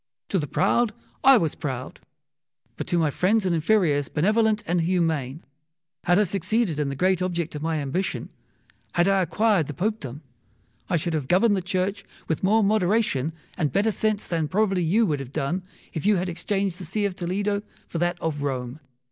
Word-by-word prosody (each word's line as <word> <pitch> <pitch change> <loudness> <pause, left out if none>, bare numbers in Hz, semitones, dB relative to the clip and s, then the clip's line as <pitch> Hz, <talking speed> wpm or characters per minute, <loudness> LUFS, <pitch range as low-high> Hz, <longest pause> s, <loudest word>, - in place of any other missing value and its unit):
To 195 - +1
the 150 - -3
proud 235 +7 +2 0.3
I 270 -1 +8
was 165 -7 0
proud, 130 -2 -5 0.8
but - - -5
to 175 - +1
my 160 -3 +2
friends 200 +7 +2
and 180 - +2
inferiors 160 -5 +2
benevolent 215 +5 +2
and 175 -1 +1
humane. 160 -5 0 0.6
Had 175 +1 +4
I 210 - +5
succeeded 195 -2 0
in 145 -2 0
the 140 - -4
great 185 +4 +2
object 175 -3 -2
of 150 - -5
my 160 0 -1
ambition, 150 +7 -2 0.6
had 175 +1 +3
I 195 -1 +3
acquired 195 -2 +2
the 150 - -6
Popedom, 175 - -3 0.7
I 180 - +2
should 165 +2 -2
have 150 -4 -2
governed 200 +6 +4
the 190 - -1
Church 185 +2 -2 0.2
with 160 - -1
more 215 +3 +4
moderation 195 - +2 0.2
and 155 -6 0
better 205 - +2
sense 215 0 0
than 165 -3 -1
probably 195 +2 +1
you 200 +8 +3
would 150 -7 0
have 135 -2 -7
done 155 +5 -1 0.3
if 160 - -3
you 210 +1 +4
had 180 0 -1
exchanged 195 +1 -2
the 185 - -6
See 205 +5 -1
of 195 -2 -2
Toledo 200 +3 -1 0.3
for 165 - -4
that 175 0 0
of 150 -3 -2
Rome. 130 -1 -3
180 Hz, 190 wpm, -25 LUFS, 155-200 Hz, 0.8 s, I